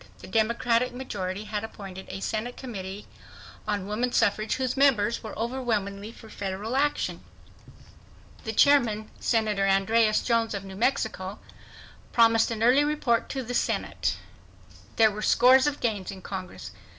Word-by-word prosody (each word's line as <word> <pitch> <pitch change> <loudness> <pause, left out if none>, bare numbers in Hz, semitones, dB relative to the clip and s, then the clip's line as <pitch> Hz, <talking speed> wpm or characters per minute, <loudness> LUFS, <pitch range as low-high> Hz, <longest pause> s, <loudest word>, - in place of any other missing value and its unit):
The - - -12
Democratic 235 +2 +1
majority 205 -6 -4
had 210 0 -4
appointed 195 -4 -8
a 195 - -6
Senate 225 +4 -3
Committee 200 -5 -7 0.6
on 205 -2 -1
Woman 225 +5 -1
Suffrage 215 0 +1
whose 255 -1 -1
members 240 -5 +3
were 220 - -8
overwhelmingly 220 -4 -2
for 230 - -14
federal 205 +3 -4
action. 290 +2 0 1.2
The 220 - -3
chairman, 225 -4 +3
Senator 215 -4 +1
Andreas 215 +3 +3
Jones 230 -3 +1
of 200 - -5
New 190 0 -9
Mexico, 210 -4 -1 0.8
promised 230 -1 +4
an 225 -1 -2
early 255 +5 +5
report 290 -6 0
to 265 -2 -3
the 245 +1 -5
Senate. - - -1 0.8
There 220 -1 +5
were 210 +1 -6
scores 260 +5 +5
of 290 -1 -1
gains 210 -5 -2
in 190 -2 -8
Congress. 185 -2 -7
220 Hz, 140 wpm, -27 LUFS, 200-245 Hz, 1.2 s, early